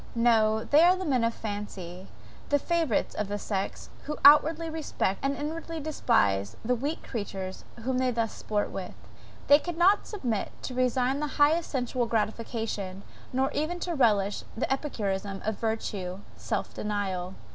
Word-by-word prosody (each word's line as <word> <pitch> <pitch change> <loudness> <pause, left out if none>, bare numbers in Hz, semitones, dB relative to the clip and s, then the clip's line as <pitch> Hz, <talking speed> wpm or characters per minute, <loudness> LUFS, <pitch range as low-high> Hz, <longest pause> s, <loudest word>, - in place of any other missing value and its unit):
No, 220 -2 +3
they 295 +2 +5
are 355 +2 +6
the 375 0 -4
men 260 -6 +2
of 230 - +2
fancy, 200 -5 -6 0.4
the 290 - +4
favourites 325 -6 0
of 210 - -2
the 205 +1 -2
sex, 195 -1 -4
who 300 +1 -3
outwardly 310 +3 +7
respect, 315 -11 -2
and 275 +1 0
inwardly 325 +3 -4
despise 100 - +1
the 250 - +2
weak 285 +7 -3
creatures 195 -5 -5 0.2
whom 255 +1 0
they 255 0 +2
thus 230 -2 -1
sport 210 -1 -2
with. 185 -2 -6 0.5
They 285 +1 +7
cannot 350 +4 +2
submit 245 - -2
to 255 - -4
resign 255 +2 +1
the 300 - -1
highest 310 +3 +4
sensual 245 -2 -1
gratification, 220 -3 -2 0.3
nor 265 +2 +1
even 320 +5 -2
to 350 - -2
relish 205 -8 +2
the 265 - +1
epicurism 200 -8 -3
of 215 -1 -2
virtue 200 -4 -3
self - - -3
denial. 190 -3 -3
235 Hz, 155 wpm, -28 LUFS, 205-290 Hz, 0.5 s, outwardly